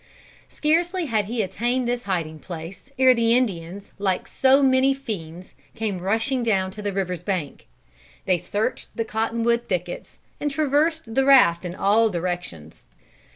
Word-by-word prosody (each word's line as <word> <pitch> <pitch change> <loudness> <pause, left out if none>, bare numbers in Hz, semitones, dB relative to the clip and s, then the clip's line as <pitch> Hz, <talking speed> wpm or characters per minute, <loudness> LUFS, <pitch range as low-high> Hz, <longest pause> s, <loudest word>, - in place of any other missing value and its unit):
Scarcely 340 +4 0
had 220 -7 0
he 225 +1 -1
attained 240 +6 -1
this 240 -1 -2
hiding 165 -5 -2
place 175 - -9
ere 260 0 +6
the 230 0 +3
Indians 195 -5 -3
like 190 -2 -1
so 270 +1 +3
many 265 +1 +4
fiends 185 -9 -7 0.2
came 210 -4 -2
rushing 225 +8 0
down 195 -5 0
to 210 - -9
the 205 -1 -2
river's 180 -3 -3
bank. 175 -6 -4 0.6
They 185 -2 +2
searched 210 +9 -3
the 230 - -2
cotton 225 +1 -2
wood 235 0 +1
thickets, 180 -2 -4 0.2
and 295 - -1
traversed 300 -2 0
the 270 - +3
raft 220 -11 +5
in 175 0 -5
all 215 +4 +3
directions. 175 - -5
220 Hz, 155 wpm, -23 LUFS, 185-260 Hz, 0.6 s, ere